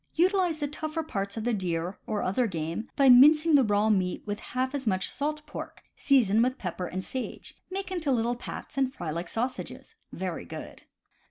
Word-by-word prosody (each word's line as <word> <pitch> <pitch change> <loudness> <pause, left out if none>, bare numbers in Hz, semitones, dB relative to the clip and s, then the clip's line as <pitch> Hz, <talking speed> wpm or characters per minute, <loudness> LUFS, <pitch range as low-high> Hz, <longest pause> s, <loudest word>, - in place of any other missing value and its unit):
— - - -45
Utilize 370 -4 +1
the 295 -1 -2
tougher 310 +2 -3
parts 200 -8 -3
of 220 - -3
the 240 +1 +1
deer, 180 -2 -2
or 215 -1 -1
other 230 +6 +1
game, 170 +4 -4
by 275 -1 +4
mincing 300 +6 +7
the 280 -2 +7
raw 205 -1 +2
meat 185 -3 0
with 205 0 -3
half 260 +1 -2
as 270 -4 -4
much 190 -2 +1
salt 300 +1 -3
pork, - - -8
season 230 -6 +3
with 255 +2 +1
pepper 180 -1 -4
and 185 +2 -5
sage, 260 -1 -5 0.2
make 380 0 -4
into 330 -6 0
little 240 -1 +1
pats, 245 - -6
and 265 -1 +2
fry 160 - -4
like 170 +2 -4
sausages. 250 +3 -4 0.2
Very - - -4
good. - - -9
245 Hz, 195 wpm, -28 LUFS, 195-290 Hz, 0.2 s, mincing